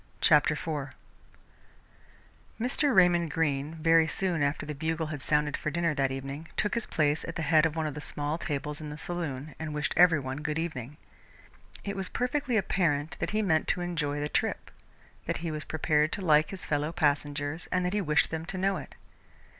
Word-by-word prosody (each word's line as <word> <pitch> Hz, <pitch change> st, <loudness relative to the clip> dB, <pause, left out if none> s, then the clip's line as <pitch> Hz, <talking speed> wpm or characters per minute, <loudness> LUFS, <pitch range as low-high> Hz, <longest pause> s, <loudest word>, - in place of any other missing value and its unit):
CHAPTER 150 Hz, 0 st, +5 dB
IV 145 Hz, -4 st, -4 dB, 1.6 s
Mr. 275 Hz, +5 st, +1 dB
Raymond 175 Hz, -2 st, +5 dB
Greene, 150 Hz, -1 st, -1 dB
very 165 Hz, 0 st, +4 dB
soon 175 Hz, -2 st, -1 dB
after 145 Hz, +1 st, 0 dB
the 150 Hz, -, -4 dB
bugle 160 Hz, +2 st, -2 dB
had 145 Hz, -, -6 dB
sounded 150 Hz, 0 st, +1 dB
for -, -, -2 dB
dinner 170 Hz, +1 st, 0 dB
that 135 Hz, -2 st, +1 dB
evening, 135 Hz, +4 st, -5 dB
took 210 Hz, -, 0 dB
his 235 Hz, -2 st, -2 dB
place 150 Hz, -1 st, +1 dB
at 165 Hz, -, -6 dB
the 165 Hz, -, -2 dB
head 155 Hz, +1 st, +5 dB
of 155 Hz, -, -7 dB
one 160 Hz, -1 st, -1 dB
of 150 Hz, -, -2 dB
the 150 Hz, -, -6 dB
small 145 Hz, +2 st, -2 dB
tables 150 Hz, +1 st, -3 dB
in 150 Hz, -, -6 dB
the 150 Hz, -, -7 dB
saloon 155 Hz, -4 st, -4 dB
and 155 Hz, -1 st, -4 dB
wished 150 Hz, 0 st, -1 dB
every 175 Hz, -3 st, +6 dB
one 130 Hz, 0 st, -4 dB
good 150 Hz, +1 st, -2 dB
evening. 150 Hz, -4 st, -4 dB, 0.9 s
It 200 Hz, -, -4 dB
was 190 Hz, -1 st, -4 dB
perfectly 250 Hz, -1 st, 0 dB
apparent 165 Hz, -6 st, +1 dB
that -, -, -1 dB
he 215 Hz, +1 st, 0 dB
meant 160 Hz, -5 st, +2 dB
to 180 Hz, -, +1 dB
enjoy 150 Hz, -5 st, -1 dB
the 145 Hz, -, -1 dB
trip, -, -, -1 dB, 0.6 s
that -, -, 0 dB
he 165 Hz, -, -1 dB
was 155 Hz, 0 st, -3 dB
prepared 155 Hz, 0 st, +1 dB
to 195 Hz, -, -1 dB
like 155 Hz, -1 st, +5 dB
his 195 Hz, -, -8 dB
fellow 150 Hz, +1 st, 0 dB
passengers 145 Hz, 0 st, 0 dB
and 180 Hz, 0 st, +1 dB
that 180 Hz, -, -1 dB
he 210 Hz, -, +1 dB
wished 150 Hz, -4 st, +2 dB
them 160 Hz, 0 st, -3 dB
to 190 Hz, -, -4 dB
know 195 Hz, +1 st, +1 dB
it. -, -, -9 dB
155 Hz, 200 wpm, -29 LUFS, 145-175 Hz, 1.6 s, every